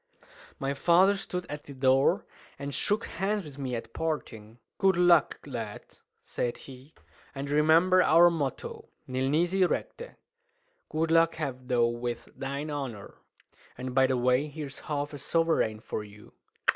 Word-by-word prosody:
My 135 +1 -2
father 180 +7 +4
stood 180 -2 -4
at 150 0 -7
the 140 - -10
door, 130 +1 +3 0.3
and 140 0 -5
shook 210 +9 0
hands 195 +2 -2
with 145 -2 -11
me 130 -3 -3
at 115 0 -7
parting. 115 -9 -4 0.2
"Good 195 -2 +4
luck, 175 -4 +4
lad," 115 -7 -7 0.2
said 120 - -3
he; 135 +3 -13 0.4
"and 135 +1 -4
remember 165 +5 +5
our 170 0 +6
motto: 145 -6 -4 0.2
Nil 130 +1 -1
nisi 175 +6 +2
recte! - - -3 0.7
Good 160 +1 -1
luck 165 0 +4
have 130 -5 -5
thou 120 -2 +3
with 120 0 -4
thine 140 +3 -4
honour. 130 -8 -5 0.6
And, 125 0 -5
by 130 0 +4
the 130 -1 0
way, 125 +4 +2
here's 145 -2 -7
half 145 -1 -3
a 145 - -7
sovereign 160 -8 +1
for 110 - -5
you." 105 0 -15
145 Hz, 150 wpm, -28 LUFS, 130-165 Hz, 0.7 s, our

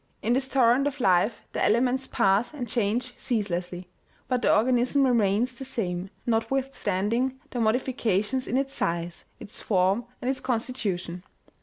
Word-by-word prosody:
In 230 - +2
this 265 +1 +1
torrent 265 +1 +3
of 290 0 -4
life 190 0 +2
the - - -1
elements 250 +4 +2
pass 200 +9 +1
and 250 -4 -4
change 235 +3 -1
ceaselessly; 180 -6 -2 0.4
but 250 -1 0
the - - +3
organism 250 +4 +3
remains 235 0 +2
the 250 - -8
same, 190 -8 -3 0.2
notwithstanding 240 0 0
the 245 - -3
modifications 230 0 0
in 250 - 0
its 275 0 -1
size, 170 0 -2
its 205 - -9
form 195 +3 +1
and 245 - -5
its 265 0 0
constitution. 220 -8 -3
235 Hz, 145 wpm, -26 LUFS, 200-260 Hz, 0.4 s, torrent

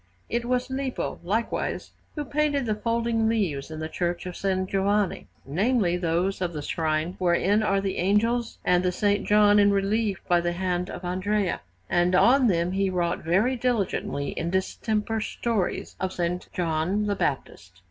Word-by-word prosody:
It 235 0 -1
was 250 +1 -1
Lippo, 265 -1 -3
likewise, 220 +6 -2 0.2
who 295 -2 -3
painted 290 -2 0
the 220 - 0
folding 230 +1 0
leaves 175 -12 -1
in 155 0 -7
the 155 - -3
Church 175 +2 -2
of 180 - -4
S. - - -10 0.3
Giovanni 200 0 0 0.2
namely, 190 - +1
those 180 +2 0
of 175 -2 -1
the 150 -2 -5
shrine 160 +3 -1
wherein 185 +4 +2
are 195 -2 +2
the 195 -1 -2
angels 225 +5 +1
and 180 0 +3
the - - +1
S. 205 +3 +1
John 210 0 +5
in 205 0 +5
relief 200 0 +1
by 175 -1 +3
the 175 0 -1
hand 180 0 -1
of 180 - -7
Andrea; 185 +2 -1 0.3
and 175 +1 +2
on 255 +6 +5
them 175 -3 +1
he 195 0 +1
wrought 175 -2 0
very 195 +11 +2
diligently 225 - -1
in 165 - -3
distemper 215 +4 -1
stories 215 -3 -2
of 190 -1 -3
S. 175 +1 -1
John 175 +4 0
the 205 -1 0
Baptist. 95 - -3
195 Hz, 170 wpm, -26 LUFS, 175-220 Hz, 0.3 s, John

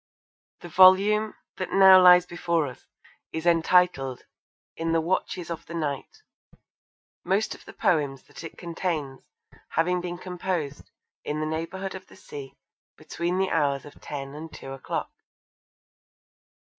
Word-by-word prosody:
The - - -8
volume 195 +5 +5 0.2
that 185 - -4
now 190 -1 +8
lies 180 -1 +8
before 170 -2 -1
us 130 -3 -10 0.4
is 160 +1 -5
entitled 170 -6 +2 0.5
In 165 0 -2
the 165 - +3
Watches 170 0 -2
of 165 0 -6
the 170 - -7
Night, 150 - -4 1.0
most 200 +3 0
of - - -14
the - - -11
poems 145 -6 0
that - - -12
it 165 - -9
contains 165 -6 -4 0.4
having 180 +2 +1
been 175 0 -5
composed 180 -5 -4 0.3
'in 150 +1 -3
the 155 - -1
neighbourhood 165 +5 -4
of 190 - -9
the - - -17
sea, 140 -2 -10 0.4
between 175 +2 -3
the 190 0 0
hours 140 -3 +1
of 145 - -14
ten 140 -1 -6
and 155 +2 -8
two 135 - -9
o'clock.' 135 -1 -4
170 Hz, 140 wpm, -26 LUFS, 150-185 Hz, 1.0 s, now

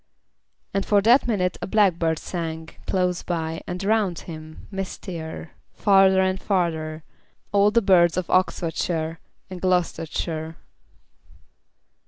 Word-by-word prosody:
And 195 - 0
for 205 0 +3
that 240 +4 +5
minute 185 -6 0
a - - -3
blackbird 175 -6 +2
sang 160 -2 -5 0.2
Close 180 -2 0
by, 160 -2 -3
and 180 +2 -4
round 205 -4 +1
him, 155 -1 -10
mistier, 175 -5 -6 0.2
Farther 195 -2 +5
and 190 0 0
farther, 160 -5 -1 0.5
all 205 0 +4
the 230 +2 +2
birds 175 -3 +4
Of 185 - -1
Oxfordshire 165 -3 0 0.3
and 180 -1 -7
Gloustershire. 165 -3 -1
180 Hz, 115 wpm, -24 LUFS, 160-195 Hz, 0.5 s, that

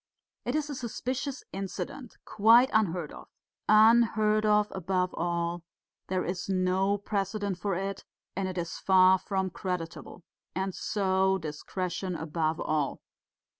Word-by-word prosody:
It 245 - -1
is 305 -1 0
a 295 - -5
suspicious 255 +2 -4
incident, 195 +6 -6
quite 230 +5 +5
unheard 180 -7 +1
of. - - -11 0.4
Unheard 215 -1 +5
of, 210 0 +3
above 185 0 -1
all; 170 0 -2 0.5
there 185 -1 -1
is 180 +2 -4
no 190 +1 +1
precedent 200 -1 -2
for 200 -2 -1
it, 195 +1 -4 0.3
and 195 -1 -1
it 185 -1 -5
is 170 -2 -4
far 190 0 +5
from 190 -1 -2
creditable.... 180 -1 -5 0.3
And 190 0 -2
so 190 -1 +1
discretion 180 +3 -4
above 160 0 -2
all.... 150 -3 -1
190 Hz, 130 wpm, -29 LUFS, 180-210 Hz, 0.5 s, quite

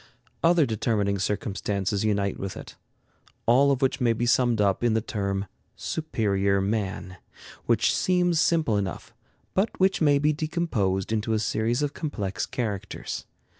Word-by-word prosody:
Other 165 -2 +5
determining 105 -3 0
circumstances 100 0 -1
unite 100 -2 0
with 95 -1 -5
it, - - -10 0.7
all 130 +4 +5
of 135 0 0
which 135 +1 +1
may 120 -2 +3
be 120 +2 -1
summed 120 -1 +3
up 100 +1 +2
in 115 -2 +3
the - - +3
term 100 -3 -2 0.3
"superior 100 -10 0
man," 95 -2 -2 0.5
which - - +3
seems 180 -2 +2
simple 155 -11 +2
enough, 95 -3 -4 0.4
but 195 +4 0
which 190 -1 +2
may 145 -2 +5
be 150 +2 +2
decomposed 145 - -1
into 110 0 0
a - - +2
series 110 +5 0
of 145 -1 -1
complex 105 - -3
characters. 105 -6 -4
110 Hz, 145 wpm, -26 LUFS, 100-145 Hz, 0.7 s, Other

